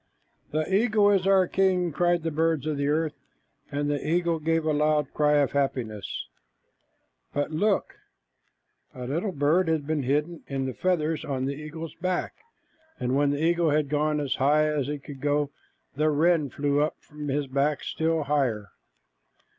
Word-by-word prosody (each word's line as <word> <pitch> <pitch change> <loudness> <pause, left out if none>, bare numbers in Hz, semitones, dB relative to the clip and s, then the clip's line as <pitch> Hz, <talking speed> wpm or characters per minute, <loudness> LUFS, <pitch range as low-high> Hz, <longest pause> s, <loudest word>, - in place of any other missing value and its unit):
"The 155 +5 -2
eagle 210 -1 +4
is 195 -2 +2
our 190 -1 +5
king," 185 -2 +2
cried 175 +1 +1
the 165 - -1
birds 160 -1 +1
on 155 -1 -1
the 140 0 0
earth, 155 +1 +1 0.6
and 145 0 -1
the 145 -1 -1
eagle 170 0 +1
gave 165 +1 0
a 155 - +2
loud 150 -1 +1
cry 150 0 +3
of 145 -2 +3
happiness. 125 -8 -2 1.1
But 145 +2 -1
look! 195 +6 +1 1.0
A 125 - -6
little 165 - -1
bird 160 +4 +2
had 160 -3 0
been 155 0 0
hidden 150 +5 -1
in 135 -1 -2
the 130 - -3
feathers 160 -3 0
on 130 -2 -2
the 140 - -1
eagle's 155 +2 -7
back, 180 +1 -2 0.7
and 125 +1 0
when 145 0 +3
the 145 +2 -1
eagle 170 0 +3
had 150 -1 +1
gone 150 +1 +1
as 140 -3 -1
high 150 +3 +3
as 150 -3 0
he 150 0 -2
could, 145 +1 -2 0.5
the 155 +2 +2
wren 155 0 +2
flew 145 +2 0
up 150 - 0
from 150 -1 -9
his 145 +1 0
back 140 +2 0
still 160 -1 0
higher. 130 -9 0
150 Hz, 170 wpm, -26 LUFS, 145-165 Hz, 1.1 s, our